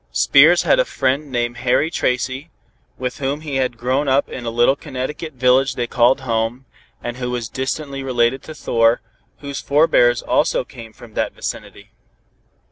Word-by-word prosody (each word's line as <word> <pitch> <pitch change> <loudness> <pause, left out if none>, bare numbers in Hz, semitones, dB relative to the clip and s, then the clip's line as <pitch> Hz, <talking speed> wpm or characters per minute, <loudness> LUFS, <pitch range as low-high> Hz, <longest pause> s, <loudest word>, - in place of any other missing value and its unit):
Spears - - +5
had - - +3
a - - +5
friend 140 - -1
named 120 -1 -2
Harry 125 +6 +1
Tracy, 130 +2 -2 0.5
with 125 -1 -4
whom 140 +2 -2
he 145 -4 -3
had 130 -2 -1
grown 130 +5 0
up 135 +1 +2
in 125 - -7
the 115 - -2
little 120 +3 +3
Connecticut 150 +3 -6
village 130 +1 +2
they 120 - -1
called 125 +2 +2
home, 115 +1 -2 0.4
and 120 0 -5
who 125 -1 -3
was 120 -2 -3
distantly 135 +3 -4
related 125 -1 +1
to 155 - -9
Thor, 115 -4 +2 0.4
whose 140 -1 -5
forebears 130 -5 +3
also - - +1
came 115 -1 -12
from 115 0 -15
that - - -2
vicinity. - - -7
130 Hz, 165 wpm, -19 LUFS, 120-140 Hz, 0.5 s, Spears